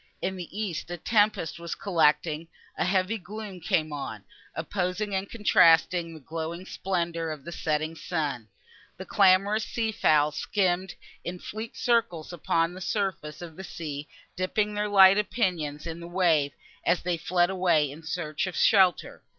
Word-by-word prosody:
In 190 +1 -2
the 180 -2 -7
east 180 -7 -3
a 175 - -4
tempest 205 -4 +1
was 170 0 -5
collecting; 160 -3 +1 0.3
a - - 0
heavy 190 +4 +1
gloom 205 0 -8
came 155 -2 0
on, 110 -8 -6 0.3
opposing 185 +4 -2
and 190 +1 -2
contrasting 170 -5 +4
the - - -10
glowing 165 +4 -5
splendour 170 -4 -2
of 155 -2 -7
the 170 - -6
setting 155 -1 -1
sun. 150 -9 -3 0.5
The - - -7
clamorous 200 +2 +4
sea 225 -1 -2
fowl 150 -7 +3
skimmed 185 +2 0 0.3
in 180 +1 -5
fleet 220 +5 -7
circles 230 -10 0
upon 165 +1 0
the 185 - -9
surface 175 -5 -2
of 165 -2 -9
the 190 - -8
sea, 150 -5 -6 0.3
dipping 210 +3 0
their 210 0 -1
light 195 +1 +6
pinions 165 -10 -1
in 165 0 -5
the 170 - -8
wave, 165 -6 +2 0.3
as 170 +1 +1
they 180 0 0
fled 175 +2 +1
away 175 -6 +2
in 150 +3 -10
search 160 0 -3
of 185 - -5
shelter. 190 -5 +3
175 Hz, 160 wpm, -27 LUFS, 160-195 Hz, 0.5 s, light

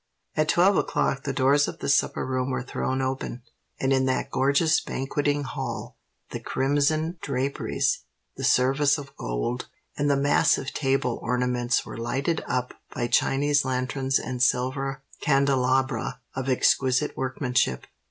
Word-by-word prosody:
At 155 0 +1
twelve 185 +4 +4
o'clock 135 - 0
the 140 - 0
doors 135 +2 +3
of - - -6
the - - -5
supper 140 - +2
room 130 0 -1
were 130 -1 -2
thrown 130 +1 -2
open; 130 -2 -3 0.4
and 135 0 +2
in 130 0 +2
that 130 0 -1
gorgeous 140 +5 +3
banqueting 145 +2 -1
hall 130 - -5 0.4
the - - -4
crimson 155 +5 0
draperies, 140 0 -1 0.4
the - - -7
service 135 +4 +3
of 140 -2 -10
gold, - - -3 0.3
and 145 0 0
the 140 - +3
massive 140 -1 +2
table 135 -3 0
ornaments 125 0 0
were - - -8
lighted 135 +7 -1
up 125 0 -1 0.2
by 120 - -2
Chinese 145 +4 +2
lanterns 130 +1 0
and 125 -1 -4
silver 135 +2 0 0.2
candelabra 135 -3 +1
of 130 +1 -3
exquisite 130 +2 +2
workmanship. 130 - 0
135 Hz, 140 wpm, -26 LUFS, 125-140 Hz, 0.4 s, twelve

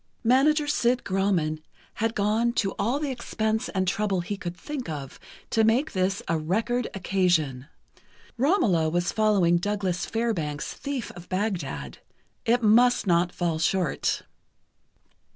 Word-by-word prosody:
Manager 285 +6 +4
Sid 250 -4 +1
Grauman 185 -5 0 0.4
had 225 0 0
gone 220 +3 +1
to 195 -5 0
all 235 +7 +1
the 295 -2 -2
expense 220 -3 -2
and 190 -2 -1
trouble 195 -1 0
he 205 +4 -4
could 175 -3 -6
think 265 - -6
of 140 -4 -6 0.3
to 225 - +3
make 240 +8 +2
this 190 +1 0
a 165 -1 +1
record 225 +9 0
occasion. 175 -9 0 0.7
"Romola" 235 - +2
was 175 +2 0
following 200 -5 +3
Douglas 190 -2 -2
Fairbanks' 175 -11 -2
"Thief 275 -4 -4
of 175 0 -13
Bagdad." 185 -6 -3 0.5
It 240 +1 +3
must 240 +3 +5
not 175 -1 +2
fall 170 -3 -1
short. 175 +1 0
200 Hz, 135 wpm, -26 LUFS, 175-235 Hz, 0.7 s, must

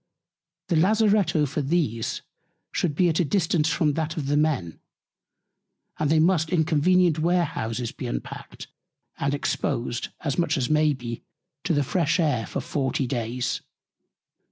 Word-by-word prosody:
The 170 - +2
Lazaretto 200 -4 +3
for 145 +2 -2
these 135 -7 -1 0.5
should 160 -5 -1
be 180 +3 +3
at 165 0 +1
a - - +4
Distance 165 -1 +1
from 150 -3 +1
that 160 +1 -2
for 165 - -3
the 140 +1 0
Men, 145 - 0 1.2
and 150 - +1
they 160 - +4
must 160 -1 +3
in 170 -3 +2
convenient 170 +1 +3
Warehouses 150 -9 0
be - - -7
unpackt, - - -6 0.5
and 140 +1 0
exposed, 120 -4 -2
as 145 -2 -2
much 170 - +1
as 130 +1 -1
may 155 -1 +4
be, 120 -3 -6 0.4
to 175 - +1
the 145 - +2
fresh 165 +4 +1
Air 145 -9 +1
for - - -3
40 135 -1 -1
Days. 120 -1 -2
155 Hz, 150 wpm, -25 LUFS, 135-170 Hz, 1.2 s, a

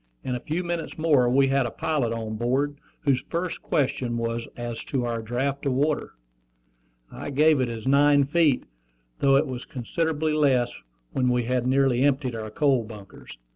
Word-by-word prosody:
In 125 - -2
a 125 - -2
few 160 +8 -3
minutes 170 -1 -4
more 145 -6 +3
we 135 +2 +4
had 135 -2 +2
a - - -3
pilot 140 -3 -1
on 110 -1 -4
board, 135 +5 -1 0.2
whose 135 -4 +1
first 175 +1 -3
question 125 -4 -1
was 115 0 -2
as 120 -1 -5
to 130 -3 -1
our 115 -1 -2
draft 130 +5 -2
of 135 - +1
water. 145 +3 0 1.0
I - - -6
gave 150 0 +4
it 125 - 0
as 115 -1 -6
nine 140 +1 +5
feet, 150 -2 +2 0.6
though 135 -1 +4
it 140 +3 +4
was 125 -3 -5
considerably 155 +4 -2
less 130 -5 +2 0.4
when 125 -2 +1
we 125 0 +1
had 125 +1 0
nearly 130 -1 +3
emptied 135 -2 +1
our 110 -1 -5
coal 135 +1 +2
bunkers. 105 - -12
130 Hz, 175 wpm, -25 LUFS, 120-145 Hz, 1.0 s, nine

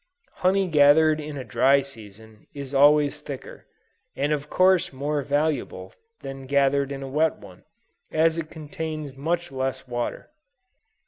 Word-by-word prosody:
Honey 190 +1 +2
gathered 155 0 +5
in 150 -1 -6
a 130 - -5
dry 135 +4 +3
season, 110 -4 -14
is 140 -1 -7
always 145 +1 +4
thicker, 140 -3 -9 0.5
and 145 +2 0
of 150 0 -4
course 185 -2 +3
more 145 +2 -2
valuable 140 -9 -2 0.3
than 135 0 -7
that 135 - -12
gathered 140 0 +2
in 135 0 -5
a - - -6
wet 155 +4 +1
one, 95 -3 -15 0.4
as 160 +1 +2
it 155 -1 -5
contains 155 -2 -6
much 170 +4 -2
less 130 0 -3
water. 120 -1 -4
145 Hz, 145 wpm, -24 LUFS, 135-155 Hz, 0.5 s, gathered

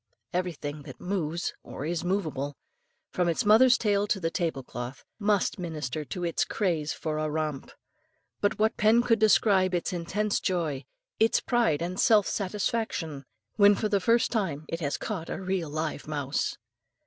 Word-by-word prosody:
Everything 155 -5 -3
that - - -11
moves 175 -3 -2
or 140 - -7
is 170 +1 -2
movable, 155 -7 -2 0.5
from 180 -1 +1
its 165 - 0
mother's 240 +4 +7
tail 205 -2 +1
to 200 - 0
the 165 -2 -1
table 165 -7 -2
cloth, 125 +1 -7
must 205 -3 +1
minister 155 -4 -4
to 175 +5 -5
its 170 -1 +1
craze 165 -7 -1
for 155 -1 -3
a 155 0 -1
romp; 150 -2 -3 0.7
but 205 - +1
what 220 +1 +1
pen 225 +3 +4
could 230 -2 +3
describe 195 -3 +4
its 175 +2 -1
intense 200 +5 -1
joy, 160 -8 -1 0.3
its 225 +1 +4
pride 170 - +1
and 180 +2 -4
self 210 -3 +5
satisfaction, 190 - -2 0.3
when, 205 -1 +7
for 215 - -1
the 200 -1 +2
first 230 +5 +2
time 165 -10 -1
it 165 - -3
has 145 -4 -1
caught 165 - -4
a - - -3
real 185 -4 -2
live 155 0 -3
mouse? 145 -2 -2
175 Hz, 165 wpm, -28 LUFS, 155-205 Hz, 0.7 s, mother's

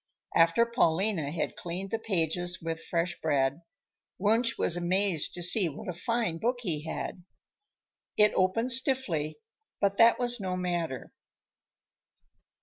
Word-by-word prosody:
After 165 +8 +4
Paulina 190 - 0
had 160 - -3
cleaned 185 +3 -6
the 225 - -1
pages 175 -3 -1
with 165 0 -5
fresh 170 0 -2
bread, 140 0 0 0.6
Wunsch 225 +4 +1
was 170 - +1
amazed 175 -1 0
to 175 - -3
see 180 0 +4
what 205 +9 -10
a 180 - -3
fine 225 -2 -2
book 240 +6 0
he 160 -8 -3
had. 175 +2 -6 0.9
It 210 0 +5
opened 225 +7 +1
stiffly, 235 - +3 0.4
but 200 0 0
that 230 0 +6
was 245 -1 0
no 185 -2 -3
matter. 175 -7 -4
180 Hz, 135 wpm, -28 LUFS, 165-220 Hz, 0.9 s, that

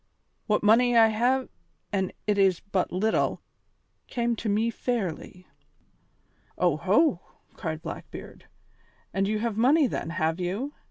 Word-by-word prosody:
What 210 -2 +1
money 235 +3 +5
I 225 -1 +7
hae 250 +4 +1 0.5
an' 190 -2 0
it 210 -1 +1
is 190 -3 +4
but 195 -3 -2
little 210 +5 0 0.7
came 235 -1 -1
to 220 - -3
me 220 +3 +1
fairly." 190 -6 -4 1.1
"Oho!" 180 - +2 0.4
cried 160 -1 -5
Blackbeard, - - -9 0.7
"and 195 0 +1
you 215 +1 0
have 220 -1 -2
money 280 +7 +4
then, 220 - -3
have 160 +1 -1
you? 200 +11 -3
210 Hz, 125 wpm, -27 LUFS, 185-235 Hz, 1.1 s, I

